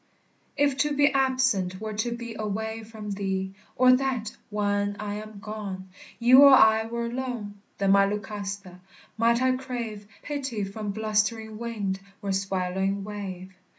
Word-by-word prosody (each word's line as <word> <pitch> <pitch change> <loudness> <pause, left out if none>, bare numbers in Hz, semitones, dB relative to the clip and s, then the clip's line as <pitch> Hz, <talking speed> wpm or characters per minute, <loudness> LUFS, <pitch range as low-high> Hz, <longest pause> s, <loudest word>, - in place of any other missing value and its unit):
If 285 -2 +2
to 295 0 +1
be 285 +1 +4
absent 260 -9 +1
were 215 0 -4
to 220 +3 -1
be 235 -1 -5
Away 220 +1 -3
from 215 -1 -8
thee; 190 -1 -2 0.2
Or 255 0 +6
that, 250 -5 -2
when 205 -1 0
I 210 -1 -3
am 215 -1 -11
gone, 200 -3 -6 0.3
You 250 +3 +7
or 280 -1 +9
I 220 -3 +6
were 235 0 -3
alone; 235 -5 -5 0.2
Then, 195 -1 +2
my 200 0 +6
Lucasta, 200 -2 -5 0.4
might 235 +2 +3
I 260 0 +3
crave 235 -5 -5 0.2
Pity 270 -7 -3
from 205 +2 -5
blustering 215 +1 -1
wind 210 -5 -3 0.2
or 200 - -1
swallowing 190 0 -1
wave. 190 -3 -7
215 Hz, 150 wpm, -26 LUFS, 200-235 Hz, 0.4 s, or